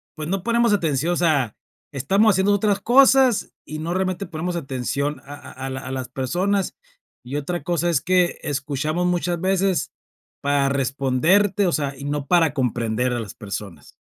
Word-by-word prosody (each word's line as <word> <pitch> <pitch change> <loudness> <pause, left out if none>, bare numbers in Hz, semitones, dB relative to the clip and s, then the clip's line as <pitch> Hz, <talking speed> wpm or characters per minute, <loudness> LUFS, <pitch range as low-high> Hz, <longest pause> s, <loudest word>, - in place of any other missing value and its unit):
pues, 155 -1 -5
no 195 -1 -1
ponemos 235 -1 +2
atención, 165 -3 +1
o - - 0
sea, 150 -10 +1 0.4
estamos 195 - +3
haciendo 190 +2 +3
otras 205 0 +1
cosas 260 -1 +5 0.2
y 155 - -6
no 165 +3 -3
realmente 185 +1 -1
ponemos 175 +2 -4
atención 140 -1 -3
a 140 - -9
a 145 - -11
a - - -3
la 130 - -4
a 130 - -7
las 130 -1 -4
personas, 180 +10 -1 0.5
y 130 +3 -6
otra 160 +2 -3
cosa 175 +1 0
es 165 -5 +2
que 180 -1 +2
escuchamos 145 +5 -1
muchas 175 -1 -1
veces 190 -3 +1 0.5
para 140 -1 +2
responderte, 140 - +2
o 175 - +2
sea, 140 -3 -2
y 140 - -9
no 145 -1 -3
para 165 -4 +3
comprender 125 -2 0
a 120 - -1
las 110 -5 -6
personas. 100 -3 -8
155 Hz, 175 wpm, -22 LUFS, 135-185 Hz, 0.5 s, cosas